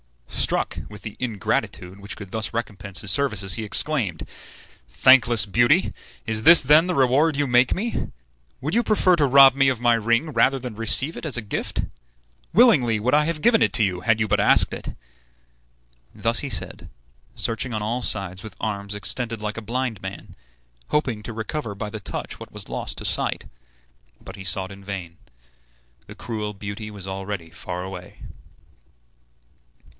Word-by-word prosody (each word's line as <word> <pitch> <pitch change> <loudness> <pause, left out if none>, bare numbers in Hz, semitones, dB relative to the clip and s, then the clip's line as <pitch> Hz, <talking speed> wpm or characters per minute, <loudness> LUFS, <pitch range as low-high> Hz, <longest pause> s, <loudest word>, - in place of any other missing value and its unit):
Struck - - -1
with 105 -1 -12
the 105 - -8
ingratitude 100 -4 -3
which 100 -3 -8
could 100 -3 -10
thus 110 +1 -3
recompense 105 -4 -4
his 100 - -4
services, 100 -6 +1
he 110 - -2
exclaimed: 110 - +2 0.6
"Thankless 120 - +5
beauty, 120 - +2 0.3
is 110 -1 0
this 170 +5 +9
then 150 +5 +5
the 180 - -1
reward 140 +4 +2
you 145 - +1
make 125 +1 +3
me? 230 +5 -2
Do - - -4 0.6
you 235 - +2
prefer 200 -5 +3
to 145 -3 +3
rob 135 0 +7
me 135 -1 +3
of 130 -3 -2
my 120 0 +3
ring 115 +7 0
rather 130 +3 +3
than 125 -3 -7
receive 125 +8 +2
it - - -8
as 145 -5 +2
a - - -2
gift? 105 - -3 0.7
Willingly 155 - +4
would 125 +6 -1
I 150 +1 +5
have 160 -1 -3
given 235 -2 +4
it - - +3
to 120 - +2
you, 90 -3 -1
had 110 +3 +1
you 110 - 0
but - - +1
asked - - +5
it." - - -7 1.2
Thus 115 +2 +1
he 140 - -4
said, 95 -5 -2 0.5
searching 115 +2 -2
on 110 -2 -3
all 120 +4 -2
sides 95 -5 0
with 110 -4 -10
arms 100 -2 -4
extended 115 +2 -2
like 105 +1 -5
a - - -4
blind 115 -2 -3
man, 95 +1 -9 0.5
hoping 130 -8 -1
to 115 - -7
recover 110 0 -5
by 105 +1 -5
the 110 - -6
touch - - -6
what - - -11
was - - -8
lost - - -5
to - - -6
sight; - - -2 0.7
but - - -11
he 100 - -10
sought 95 +1 -3
in 100 0 -12
vain. 95 -4 -7 0.9
The - - -11
cruel 105 -1 -5
beauty 100 +2 -7
was 100 -2 -8
already 95 -3 -6
far 90 0 -6
away. 90 -1 -9
110 Hz, 175 wpm, -23 LUFS, 100-130 Hz, 1.2 s, this